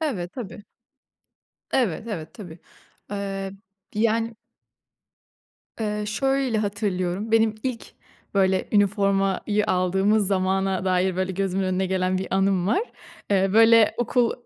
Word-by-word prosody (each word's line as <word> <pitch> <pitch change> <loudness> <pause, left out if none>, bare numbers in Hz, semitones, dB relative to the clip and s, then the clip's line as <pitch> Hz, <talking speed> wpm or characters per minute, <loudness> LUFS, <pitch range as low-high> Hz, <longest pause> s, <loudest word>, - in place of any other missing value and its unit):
Evet. 200 - -3
Tabii. 210 -4 -8 1.1
Evet, 225 -4 0
evet, 165 -8 -6
tabii. 175 -6 -10 0.5
Eee, 195 -1 -4 0.4
yani 225 +1 0 1.4
eee, 210 -1 -2
şöyle 270 +1 0
hatırlıyorum; 200 0 -2
benim 225 -1 +4
ilk 255 -3 -4 0.4
böyle 190 -1 +2
üniformayı 200 0 +2
aldığımız 190 +3 +2
zamana 190 0 0
dair 185 0 +1
böyle 185 0 -1
gözümün 195 0 -1
önüne 185 0 0
gelen 185 0 0
bir 190 - -4
anım 190 -2 +2
var. 385 - +2 0.5
Eee, 195 -1 +3
böyle 225 0 +6
okul, 240 0 +1
195 Hz, 110 wpm, -24 LUFS, 190-220 Hz, 1.4 s, böyle